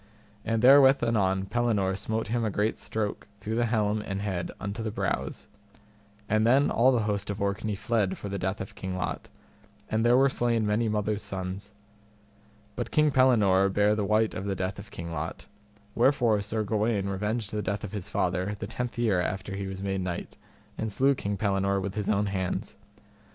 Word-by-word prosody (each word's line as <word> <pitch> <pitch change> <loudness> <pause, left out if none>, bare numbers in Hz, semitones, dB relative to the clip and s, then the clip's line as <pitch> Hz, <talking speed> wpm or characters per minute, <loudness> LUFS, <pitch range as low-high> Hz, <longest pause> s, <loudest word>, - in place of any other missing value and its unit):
And 115 +1 -1
therewith 135 0 +7
anon 95 -5 +1
Pellinore 105 -4 +1
smote 110 +2 -3
him 120 0 0
a 110 - +1
great 105 +2 -1
stroke 110 -1 -3
through 105 +2 -4
the 120 +1 +1
helm 110 -2 +1
and 95 -2 -4
head 95 -4 -3
unto 100 +2 -4
the 110 - -2
brows. - - -3 0.8
And 110 +1 +2
then 130 +5 +4
all 125 +3 +4
the 120 -4 +1
host 105 -1 -2
of 100 0 -3
Orkney 100 +1 -1
fled 105 -2 0
for - - -6
the 100 0 -3
death 95 +3 -2
of 95 - -6
King 95 -1 -5
Lot, 90 - -4 0.6
and 110 +1 +1
there 120 +1 +5
were 135 +1 +5
slain 120 -4 +1
many 110 +2 +1
mothers' 105 0 -1
sons. 100 0 -5 1.0
But 120 -1 -3
King 150 -1 +3
Pellinore 105 -8 +4
bare 105 +2 +3
the 105 -1 0
wite 110 +2 +2
of 95 - -5
the 100 -1 -1
death 95 +1 -3
of 100 - -10
King 85 0 -7
Lot, 80 0 -5 0.5
wherefore 120 -4 +3
Sir 110 +2 -2
Gawaine 105 -1 0
revenged 105 +3 -2
the 105 - -2
death 100 0 -3
of - - -5
his 105 -4 -5
father 95 +3 -1
the - - -5
tenth 125 -1 -4
year 110 -7 +2
after 95 +2 -3
he 100 0 -4
was 95 0 -6
made 95 -1 -1
knight, 90 -1 -4 0.4
and 110 -1 -2
slew 135 +7 +3
King 100 -6 -3
Pellinore 100 -1 +1
with 95 0 -3
his 105 -1 -2
own 105 -1 +2
hands. 95 -2 -3
105 Hz, 195 wpm, -28 LUFS, 95-115 Hz, 1.0 s, therewith